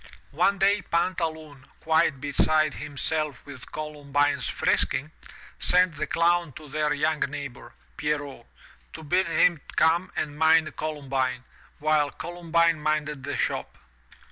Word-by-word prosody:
One 200 - +2
day 200 +2 +3
Pantaloon, 160 -6 -2
quite 160 -3 +2
beside 155 +2 +2
himself 150 0 -2
with 140 -3 -11
Columbine's 145 -1 -1
frisking, 150 +3 0 0.5
sent 180 -1 +3
the 145 - -3
Clown 170 -2 +2
to 155 +4 -11
their 150 +1 -1
young 155 +1 +1
neighbor, 140 -3 -5 0.2
Pierrot, 145 -5 -3 0.5
to - - -9
bid 180 +5 +1
him 165 -1 +3
come 170 +4 +3
and 150 0 -3
mind 160 0 +4
Columbine, 135 -4 -2 0.3
while 150 -1 +2
Columbine 170 -1 0
minded 150 -2 -1
the 145 +2 -3
shop. - - -2
155 Hz, 120 wpm, -26 LUFS, 145-165 Hz, 0.5 s, mind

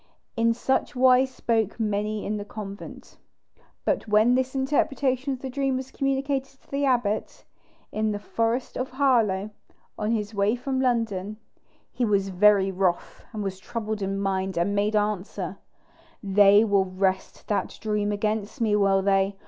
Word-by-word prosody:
In 230 0 +3
such 265 +3 -1
wise 255 +1 +5
spoke 225 -4 -1
many 210 0 -1
in 210 +1 -2
the 205 - -4
convent. 205 -1 -9 0.7
But - - 0
when 215 +3 +4
this 260 +1 0
interpretation 270 -1 0
of 260 - -7
the 265 - -3
dream 270 0 0
was 260 0 -6
communicated 275 0 -2
to - - -27
the 280 +1 0
abbot, 240 -6 -1 0.5
in 215 0 0
the 205 - -2
forest 230 +4 -2
of 255 +1 -2
Harlow, 230 -7 +1 0.5
on 210 - -1
his 220 -2 -1
way 200 +2 +2
from 260 +1 -2
London, 220 -5 -1 0.5
he 250 - -2
was 200 -3 +1
very 195 +1 +4
wroth, 185 -2 -1
and 215 -3 -4
was 190 -1 -4
troubled 215 0 -4
in 195 0 -2
mind, 190 -1 -1
and 175 +4 +1
made 205 +1 +1
answer: 210 -2 -2 0.6
"They 200 +1 +6
will 200 -3 +2
wrest 190 0 -2
that 205 - -1
dream 210 -1 -1
against 210 +3 -2
me, 220 -3 +2
will 195 -2 +3
they? 195 0 +2
215 Hz, 155 wpm, -25 LUFS, 200-250 Hz, 0.7 s, They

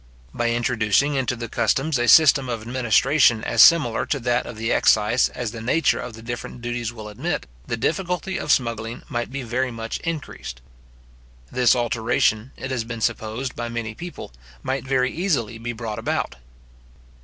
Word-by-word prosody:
By 120 0 0
introducing 120 +3 +1
into 130 -3 0
the 115 -1 -5
customs 135 +5 0
a 120 - +1
system 135 0 +6
of 115 -2 -3
administration 120 +1 +3
as - - +3
similar 155 -9 +5
to 140 - 0
that 120 0 0
of 120 - -8
the 115 +2 -2
excise 110 +4 +3
as 120 -3 -4
the 115 -1 -8
nature 130 +8 +2
of 120 - -6
the 110 0 -11
different 120 0 -6
duties 120 -1 -3
will 110 -3 -9
admit, 105 - -3 0.2
the 115 - -2
difficulty 180 - -1
of 150 - -1
smuggling 115 -2 -1
might 120 0 -3
be 135 0 -4
very 125 +3 -1
much 115 -1 -5
increased. 150 - -5 0.9
This 125 -1 +4
alteration, 115 -1 +1
it 130 - -5
has 125 -3 -1
been 115 0 -7
supposed 110 +5 -2
by 120 0 -4
many 115 -2 -4
people, 175 - -9 0.3
might 135 +1 -2
very 130 -1 +1
easily 130 - -1
be 120 +1 -4
brought 115 -2 -5
about. - - -2
120 Hz, 170 wpm, -23 LUFS, 115-130 Hz, 0.9 s, system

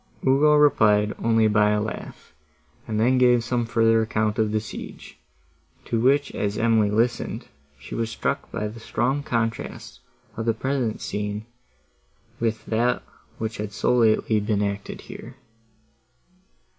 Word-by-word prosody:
Ugo 150 +3 +5
replied 105 -8 +4
only 115 -1 +4
by 105 0 +3
a 105 0 +2
laugh, 110 +1 -7 0.5
and 110 -2 -2
then 125 +3 +3
gave 125 -2 +4
some 120 0 -1
further 115 -1 +3
account 110 -1 -1
of 110 -1 +1
the 110 - +1
siege, 105 - -9 0.7
to 115 - -1
which 140 +3 +2
as 100 0 -2
Emily 110 -2 +3
listened, 120 +3 -1 0.3
she 65 - -11
was 115 -1 -2
struck - - -3
by 105 - -2
the 110 +2 -9
strong 125 +5 -1
contrast 115 -4 -3 0.4
of 110 +1 -4
the 115 - +2
present 130 -2 -2
scene 105 +1 -4 0.9
with 110 -1 -1
that 120 +2 0 0.3
which 110 0 -4
had 105 -1 -4
so 110 - +1
lately 110 -2 +3
been 105 0 0
acted 100 0 -4
here. 125 +2 -10
115 Hz, 145 wpm, -24 LUFS, 105-120 Hz, 0.9 s, Ugo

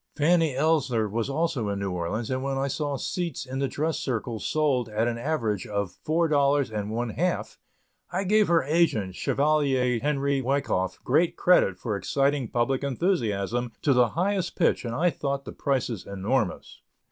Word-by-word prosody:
Fanny 160 -2 +3
Ellsler 135 -7 +2
was 115 +5 -2
also 140 -7 -1
in 100 - -2
New 100 -1 -2
Orleans, 90 +7 -3
and 130 0 -1
when 135 0 -2
I 135 +1 0
saw 140 +1 -2
seats 170 -2 -3
in 130 0 -5
the 135 - +1
dress 155 +4 -2
circle 115 -3 -3
sold 130 -1 0
at 110 +2 0
an 115 -1 -2
average 115 -8 -1
of 100 -3 -2
four 165 +2 0
dollars 140 -3 +2
and 105 -1 -3
one 115 +2 -2
half, 180 +9 -2 0.5
I 185 +2 -1
gave 210 +2 +3
her 170 -3 +3
agent, 135 - +1
Chevalier 135 -1 +1
Henry 140 0 0
Wyckoff, 130 -8 0
great 160 +6 +2
credit 100 - +4
for 105 +2 -3
exciting 140 +5 0
public 125 +4 0
enthusiasm 120 - -1
to 140 - +4
the 125 -2 +4
highest 190 0 0
pitch 165 - +1
and 115 -1 -3
I 175 +6 +2
thought 140 -2 -3
the - - -6
prices 125 -7 -2
enormous. 100 +2 -2
135 Hz, 170 wpm, -26 LUFS, 115-155 Hz, 0.5 s, credit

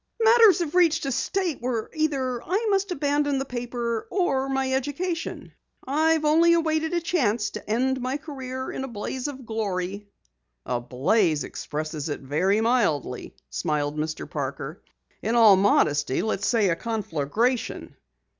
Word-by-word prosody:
Matters 450 -4 +6
have 335 -5 -3
reached 330 -4 +3
a 275 - -1
state 350 +3 -1
where 240 -3 -2
either 270 -6 -1
I 400 +6 -1
must 395 0 +1
abandon 290 -2 +1
the 270 - -2
paper 240 -2 -3
or 270 -8 0
my 265 -1 0
education. 325 +6 -3 0.3
I've 310 +3 +2
only 330 +3 +5
awaited 320 -1 +1
a - - +2
chance 240 - 0
to - - -8
end 260 +4 +1
my 255 +3 -1
career 260 -3 -6
in - - -4
a - - -4
blaze 245 +3 -4
of 265 -3 -7
glory." 200 -2 -3 0.6
"A 125 -1 -1
blaze 150 - +1
expresses 155 0 -5
it 145 - -4
very 180 +10 +1
mildly," 210 - 0 0.2
smiled 150 -3 -1
Mr. 155 +1 -3
Parker. 140 +3 -5 0.4
"In 225 +3 -1
all 220 -4 +8
modesty, 150 -8 +2
let 220 - -1
us - - -1
say 220 -5 +3
a 170 - +2
conflagration!" 220 - -2
250 Hz, 150 wpm, -25 LUFS, 195-300 Hz, 0.6 s, all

